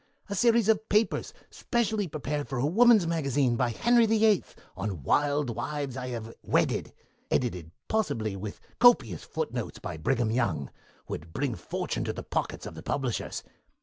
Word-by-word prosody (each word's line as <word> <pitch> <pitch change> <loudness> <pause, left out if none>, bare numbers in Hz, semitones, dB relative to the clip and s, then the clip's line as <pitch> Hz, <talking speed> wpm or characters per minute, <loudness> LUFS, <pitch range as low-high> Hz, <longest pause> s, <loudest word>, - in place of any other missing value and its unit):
A - - -2
series 230 +1 +4
of 220 0 +2
papers 215 +2 +1 0.2
specially 220 -4 0
prepared 150 -1 -3
for 135 - -3
a 125 - +1
woman's 220 +4 +6
magazine 140 -6 +1
by 120 +1 +1
Henry 235 - +4
VIII. 215 -3 +4 0.3
on 95 -6 -4
'Wild 145 - +2
Wives 135 +3 -3
I 130 -1 -4
Have 115 -2 -5
Wedded', - - +1 0.4
edited, 90 -10 -1 0.2
possibly, 115 - 0
with 100 +2 -6 0.2
copious 175 - +5
footnotes - - -4
by 85 - -6
Brigham 115 +7 +1
Young, 95 - 0 0.4
would 80 +2 -6
bring 140 -3 -1
fortune - - -3
to - - -2
the - - -6
pockets - - -3
of - - -7
the - - -9
publishers. 130 -5 -2
140 Hz, 155 wpm, -28 LUFS, -, 0.4 s, woman's